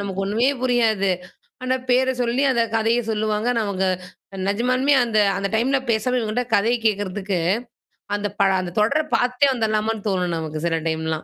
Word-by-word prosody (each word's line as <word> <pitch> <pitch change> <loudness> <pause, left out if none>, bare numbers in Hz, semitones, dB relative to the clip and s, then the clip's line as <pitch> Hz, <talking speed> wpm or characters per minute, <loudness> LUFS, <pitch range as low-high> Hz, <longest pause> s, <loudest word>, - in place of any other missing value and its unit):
நமக்கு 195 -1 -3
ஒண்ணுமே 220 +6 +1
புரியாது. 225 -6 +2 0.5
ஆனா 255 0 +1
பேர 260 +1 +3
சொல்லி, 245 +3 0
அந்தக் 230 -3 0
கதைய 225 +2 +2
சொல்லுவாங்க. 215 +1 -1
நமக்கு 195 -3 -1 0.5
அ - - -8
நிஜமாலுமே 255 +7 +2
அந்த 225 -2 -1 0.2
அந்த 200 0 -1
டைம்ல 265 +5 +2
பேசவே 250 +3 0
வேண்டாம், 245 +3 -2
கதையக் 230 +3 +1
கேக்குறதுக்கு, 200 -2 -2 0.8
அந்தப் 205 0 -4
பழ 195 - +4
அந்தத் 180 +2 -5
தொடரப் 300 +8 +1
பாத்துட்டே 250 +3 +2
வந்திர்லாமான்னு 220 -2 -1
தோணும் 180 -3 -1
நமக்கு 155 0 -5
சில 165 -1 0
டைம்லாம். 160 0 -2
220 Hz, 155 wpm, -22 LUFS, 200-245 Hz, 0.8 s, பழ